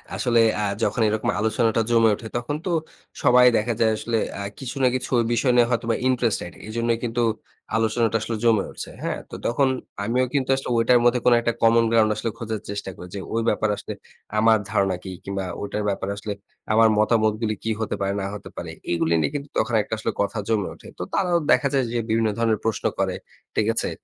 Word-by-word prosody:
আসলে 120 -2 +2 0.2
আ - - 0 0.2
যখন 120 - 0
এরকম 110 0 0
আলোচনাটা 110 +1 +1
জমে 115 -1 +5
ওঠে, 110 - -9
তখন 120 +5 -3
তো - - -1 0.5
সবাই 125 0 +6
দেখা 115 +2 0
যায় 110 -1 +4
আসলে 115 +1 -1 0.2
আ - - -4 0.2
কিছু 135 0 -6
না 130 - +6
কিছু 130 - -4 0.2
বিষয় 125 +2 +2
নিয়ে 120 -1 +5
হয়তোবা 115 -1 0
ইন্টারেস্টেড। 120 -8 0 0.2
এজন্যই 115 +1 0
কিন্তু 120 0 -1 0.5
আলোচনাটা 115 0 +2
আসলে 115 +1 -3
জমে 110 -4 +4
উঠেছে, - - -7
হ্যাঁ? - - -2
তো - - -8
তখন 135 +3 +2 0.4
আমিও 125 +5 +1
কিন্তু 135 -2 0
আসলে 135 - -5
ওটার 120 +1 +5
মধ্যে 120 +1 +4
কোন 125 - +6
একটা 120 0 0
common 115 0 +5
ground 110 -2 +4
আসলে 115 - -2
খোঁজার 110 -2 -3
চেষ্টা 100 -1 -4
করি 90 - -9
যে, - - -3
ওই 115 - +1
ব্যাপারে 110 - +1
আসলে - - -6 0.5
আমার 110 0 +5
ধারণা 100 -3 +2
কি? 95 - -7
কিংবা 100 -1 -3 0.2
ঐটার 100 +1 -3
ব্যাপারে 100 0 -2
আসলে 105 +1 -4 0.4
আমার 110 0 +6
মতামতগুলো 110 0 +2
কি 115 - -2
হতে 110 - -1
পারে 100 0 0
না - - -2
হতে 105 - -9
পারে? - - -5 0.2
এগুলো 85 -1 +1
নিয়ে - - 0
কিন্তু 140 0 -4
তখন 120 - 0
একটা 105 - -6
আসলে 110 +1 -2
কথা 100 +2 -1
জমে 105 -4 +1
ওঠে। - - -15
তো - - -2
তারাও 180 -3 +2
দেখা 125 +2 +4
যায় 135 -1 +3
যে, 120 - -1
বিভিন্ন 110 0 +2
ধরনের 115 -2 +1
প্রশ্ন 110 -2 -1
করে। - - 0 0.4
ঠিক 110 - +2
আছে? - - 0
115 Hz, 205 wpm, -23 LUFS, 110-120 Hz, 0.5 s, সবাই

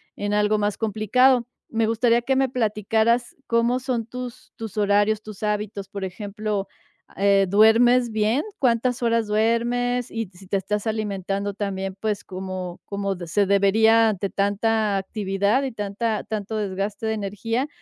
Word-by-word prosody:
en 205 0 -2
algo 210 0 +2
más 205 0 -1
complicado. 235 +3 +2 0.2
Me 225 -1 +1
gustaría 235 +1 +2
que 265 +2 0
me 265 -1 +2
platicaras 225 0 +1
cómo 235 +2 +2
son 250 -3 -2
tus 250 +1 -8
tus 220 -3 -7
horarios, 205 +1 +2
tus 215 -1 -10
hábitos, 210 -2 -2
por 200 -2 -6
ejemplo, 205 +1 -4 0.5
eh, 195 0 +4
¿duermes 235 +4 +5
bien? 220 +6 +1 0.2
¿Cuántas 245 -1 +1
horas 230 -2 +2
duermes? 240 +3 +1
Y 225 -4 -3
si 185 +1 -15
te 200 - -1
estás 210 +3 -2
alimentando 200 -2 -2
también, 195 -2 -3
pues, 215 -2 -2
como 185 -1 -6
como 200 -1 -2
se 200 +5 +2
debería 220 +3 +4
ante 200 -1 -2
tanta 205 +1 +1
actividad. 200 +5 0
y 260 -3 -3
tanta 210 +1 -2
tanto 215 0 -4
desgaste 205 +2 -3
de 220 - 0
energía. 220 +6 -2
215 Hz, 150 wpm, -23 LUFS, 200-230 Hz, 0.5 s, duermes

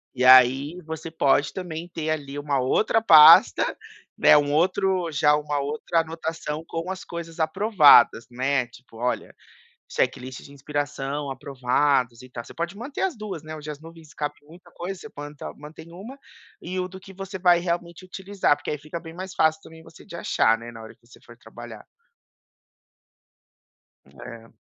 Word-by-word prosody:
E 125 0 0
aí 130 +6 +5
você 160 0 -7
pode 140 -3 +1
também 175 -2 -6
ter 160 -2 -5
ali 145 -2 -4
uma 145 -2 -1
outra 215 - +1
pasta, 155 -8 +7 0.4
né, - - +6
um 145 -1 +2
outro 185 +2 +1
já 150 0 +3
uma 150 -1 -2
outra 150 +4 -1
anotação 160 -1 -5
com 165 +2 -5
as 190 +1 -7
coisas 170 0 -8
aprovadas, 160 - +5
né. 130 +1 0
Tipo, 120 -1 -17
olha 125 +2 -3 0.6
checklist 130 +1 -2
de - - -15
inspiração 145 0 -4
aprovados 130 -2 -1
e 130 - -14
tal. 120 -2 -8
Você - - -14
pode 170 +3 -4
manter 245 +7 -7
as 380 -7 -1
2, 200 -8 -7
né, 155 0 -8
hoje 155 0 -9
as 150 -1 -7
nuvens 165 -1 -14
cabem 150 -1 -5
muita 175 +2 -17
coisa, 180 +2 -7
você - - -10
planta 145 0 -9
mantém 160 +3 -13
uma 210 +10 -10 0.4
e 185 +2 -5
o 180 - -2
do 190 0 -11
que 195 +1 -14
você 195 0 -7
vai 175 -1 +4
realmente 170 0 -4
utilizar, 190 -2 -1
porque - - -6
aí 150 - -3
fica 155 +3 -7
bem 165 -1 -11
mais 185 +2 -8
fácil 160 0 +2
também 160 0 -15
você 165 - -16
de 170 - -11
achar, 115 -8 +1
né, 120 +1 -10
na 115 -1 -11
hora 110 - -12
que - - -31
você 120 - -19
for 120 0 -16
trabalhar. 120 -4 -12 2.2
Hum, 70 +1 -19
é. 115 -1 -11
155 Hz, 175 wpm, -24 LUFS, 140-175 Hz, 2.2 s, pasta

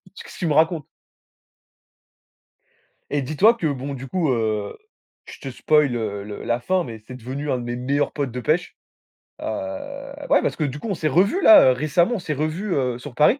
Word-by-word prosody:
qu'est-ce - - -11
tu 180 - -3
me 150 - +1
racontes?» 160 -1 +2 2.2
Et 145 - 0
dis-toi 155 - +4
que 175 -9 -2
bon 140 0 -3
du 135 0 -7
coup, 165 0 0
heu, 110 -3 -1 0.5
je - - -11
te 135 - -6
spoile 150 +2 +2
le 105 -4 -3
le 105 0 -7
la 120 +1 0
fin, 185 +8 0
mais 115 -5 -8
c'est 125 - -8
devenu 130 +5 -5
un 130 - +1
de 120 - -5
mes 120 0 -3
meilleurs 140 +4 0
potes 140 -4 -3
de 125 - -5
pêche. 165 +7 0 0.7
Heu, - - -5 0.8
ouais - - +5
parce - - 0
que 155 - -2
du 145 0 -3
coup - - -6
on - - 0
s'est 160 -3 -1
revus, 195 - +2
là, 305 - +8
récemment, 155 - +1
on - - -2
s'est 170 -4 -3
revus, 160 +7 -2
heu, 125 -3 -1
sur 130 -1 -10
Paris. 180 - +4
145 Hz, 200 wpm, -22 LUFS, 125-165 Hz, 2.2 s, là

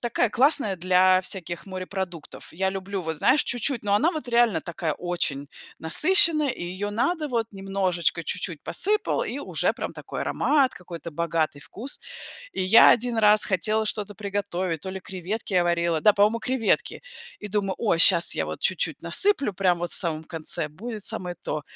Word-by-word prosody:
такая 240 -1 0
классная 250 -6 +3
для 185 +1 +4
всяких 175 -2 -3
морепродуктов. 185 -3 -7
Я 190 +3 -1
люблю, 195 0 -5
вот, 160 -1 -4
знаешь, 265 - +3
чуть-чуть, 245 +1 0
но 200 -1 +1
она 320 - +2
вот 300 -6 -6
реально 235 -8 +3
такая 170 -2 -3
очень 155 -6 -2 0.3
насыщенная 310 - +4
и 250 - -6
ее 185 +4 -4
надо 305 +9 -1
вот 235 -5 -1
немножечко, 195 -3 -1
чуть-чуть - - -5
посыпал, 425 +4 0
и - - -5
уже - - 0
прям - - -6
такой - - -7
аромат, 275 -3 +1
какой-то 170 -2 -9
богатый 160 -2 -1
вкус. 220 - -4 0.5
И - - -2
я 200 +5 +7
один 240 -1 +1
раз 210 0 +5
хотела 215 +4 0
что-то 210 -1 -2
приготовить, 190 -5 -3
то 190 - -5
ли 190 0 -6
креветки 190 +4 -6
я 180 - +3
варила, 170 -1 0
да, 210 +7 +5
по-моему 210 +3 +2
креветки. 250 -2 -1 0.4
И 210 - -7
думаю: 195 -2 -1
о, 210 -7 +1
щас 170 +1 +6
я - - -1
вот - - -6
чуть-чуть - - +1 0.2
насыплю, 390 - +1
прям 180 -3 +1
вот 175 0 -4
в - - +2
самом 160 -3 0
конце, 155 -1 -3
будет 215 +7 -8
самое 180 -1 -4
то. 150 - -4
195 Hz, 175 wpm, -25 LUFS, 175-230 Hz, 0.5 s, я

